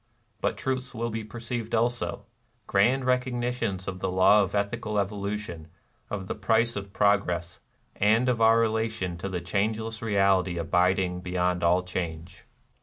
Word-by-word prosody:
But - - 0
truths 130 -1 -3
will 115 0 -2
be 110 0 -4
perceived 115 +1 -4
also, 120 +2 -1 0.2
— 120 -1 -41
grand 125 +7 +2
recognitions 125 -6 -1
of 95 0 -4
the 95 - -1
law 95 +3 +5
of 100 0 -2
ethical 105 +1 -1
evolution, 100 -4 -3 0.4
of 100 -2 -4
the - - -2
price 115 +3 +1
of 100 -1 -6
pro 100 0 +4
gress, 90 0 -5 0.4
and 110 +5 +3
of 120 -3 +1
our 115 0 +6
relation 110 -5 0
to 100 - -4
the 90 -2 -3
changeless 110 +3 -2
Reality 95 -4 +2
abiding 90 +2 +1
beyond 90 -1 -1
all 90 +2 +3
change. 85 -2 -5
105 Hz, 155 wpm, -27 LUFS, 95-115 Hz, 0.4 s, our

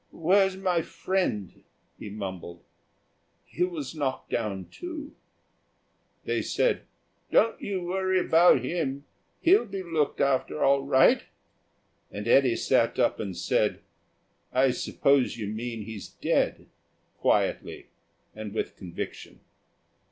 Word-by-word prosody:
"Where's 190 +3 +2
my 180 -3 +1
friend?" 160 - -2 0.4
he 105 - -7
mumbled. 95 -4 -7 0.8
"He 175 - -2
was 165 -7 -3
knocked 140 -4 -3
down, 100 -5 -2
too." 320 -4 -7 1.1
They - - 0
said, - - 0 0.4
"Don't 230 - +3
you 190 -3 -3
worry 185 +1 0
about 170 -5 +5
him; 140 -2 -2 0.4
he'll 345 - +5
be 195 -1 -5
looked 160 -5 -1
after 140 +2 +1
all 140 0 +4
right," 130 -1 +4 0.8
and 105 +2 -6
Eddy 125 -1 +5
sat - - +2
up - - +2
and 95 -5 -4
said, 90 - +1 0.7
"I 130 +1 +3
suppose 135 0 +1
you 110 - -4
mean 110 +2 -4
he's 105 -2 -8
dead," - - 0 0.5
quietly, - - 0 0.5
and 110 -1 -7
with - - -3
conviction. 90 -3 -7
140 Hz, 115 wpm, -27 LUFS, 110-185 Hz, 1.1 s, about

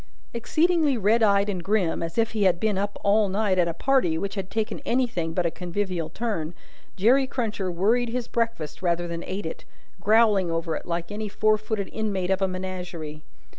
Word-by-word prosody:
Exceedingly 310 +4 +2
red 220 +2 +3
eyed 200 -2 +4
and 185 -4 -3
grim, 195 -4 +1
as 165 +3 -4
if 225 -1 +2
he 220 - -2
had 185 -3 +4
been 215 0 +1
up 200 +1 -2
all 205 0 +3
night 195 -1 +1
at 175 - +4
a 170 - -1
party 250 -9 +2
which 195 +4 -3
had 195 -2 -4
taken 220 +1 -2
anything 230 -10 0
but 175 +1 0
a 170 - +1
convivial 180 -2 -3
turn, 170 -5 -3 0.4
Jerry 255 +8 +4
Cruncher 215 -8 -2
worried 225 +8 +2
his 245 0 -3
breakfast 225 -12 -2
rather 175 -1 0
than 170 0 -5
ate 190 0 -4
it, 160 - -6 0.4
growling 210 -2 +4
over 165 -1 -1
it - - -6
like 170 +1 -3
any 210 0 -4
four 215 +1 +3
footed 215 -2 -3
inmate 195 -4 -1
of 190 +1 +1
a 195 - +3
menagerie. 180 -5 -5
200 Hz, 195 wpm, -25 LUFS, 175-220 Hz, 0.4 s, eyed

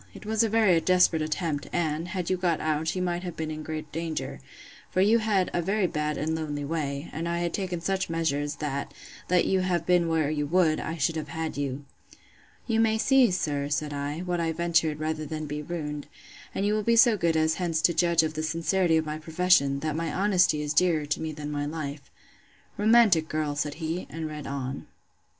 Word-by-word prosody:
It - - -11
was 220 +1 +1
a 225 - +2
very 205 -6 +4
desperate 180 -3 +3
attempt, 155 -1 -2
and, 160 -1 -1
had 180 -2 -4
you 185 - +2
got 175 -3 0
out, 155 +2 -1
you 185 - -1
might 175 -1 -1
have 175 -2 -6
been 160 -1 -3
in 155 0 -5
great 155 -1 -6
danger; 165 0 -4 0.5
for - - -1
you 215 +5 +5
had 205 -4 +1
a 175 - +1
very 195 +3 +1
bad 150 -3 -1
and 155 +2 -1
lonely 150 -3 -3
way; 145 -1 -3
and 165 +3 -3
I 170 - -1
had 170 0 -2
taken 180 -4 -3
such 190 +1 -1
measures, 145 -3 -1
that, 140 -3 -4 0.3
let 180 -1 +3
you 190 - +2
have 180 -3 0
been 175 -1 +3
where 160 -2 +1
you 150 -1 -1
would, 165 -1 +3
I 165 +2 -4
should 160 +2 0
have 155 - -4
had 160 -1 -4
you. 140 0 -3 0.8
You 225 -2 +1
may 220 -1 +3
see, 260 +2 +4
sir, 145 -6 -1
said 145 0 -1
I, 145 +3 -3
what 180 -1 -2
I 165 -1 0
ventured, 165 -2 +1
rather 155 0 -2
than 155 +1 -4
be 150 0 -4
ruined; 150 -2 -5 0.5
and 195 - 0
you 205 - +2
will 215 - +1
be 235 +2 +2
so 230 -1 +6
good 170 -4 +1
as 160 0 +2
hence 165 -3 0
to 170 - +4
judge 170 0 +3
of 155 -1 -2
the 155 - -3
sincerity 165 +2 +1
of 160 - 0
my 155 0 -4
profession, 155 -4 +2
that 155 -1 -2
my 165 -1 -2
honesty 185 -5 +2
is 150 0 -2
dearer 160 -2 +3
to 145 - -2
me 160 0 -3
than 150 -1 -6
my 145 0 -2
life. 145 -2 -6 0.7
Romantic 210 -7 +4
girl! 155 -2 -1
said 150 0 -2
he, 165 +2 -4
and 160 0 -5
read 150 -1 -7
on. 135 -1 -5
160 Hz, 215 wpm, -27 LUFS, 150-180 Hz, 0.8 s, so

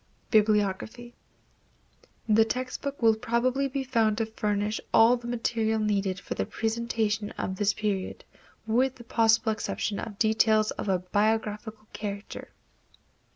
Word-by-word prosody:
Bibliography. 215 +2 +1 1.1
The 220 0 +5
text 255 +3 -4
book 280 -3 -5
will 225 -1 +6
probably 250 +5 0
be 275 0 -3
found 225 -4 +1
to 225 - 0
furnish 210 -1 -2
all 225 +2 +6
the 240 -1 -8
material 230 -2 0
needed 200 -3 0
for - - -5
the 95 - -3
presentation 220 -2 -1
of 190 - -3
this 205 +1 +2
period, 200 -3 -3 0.4
with 250 +4 +1
the 240 - -12
possible 225 -1 +3
exception 215 -1 -3
of 205 -3 -6
details 220 -1 +3
of - - -4
a 190 - +3
biographical 215 +3 -1
character. 205 -1 -6
220 Hz, 135 wpm, -27 LUFS, 210-235 Hz, 1.1 s, will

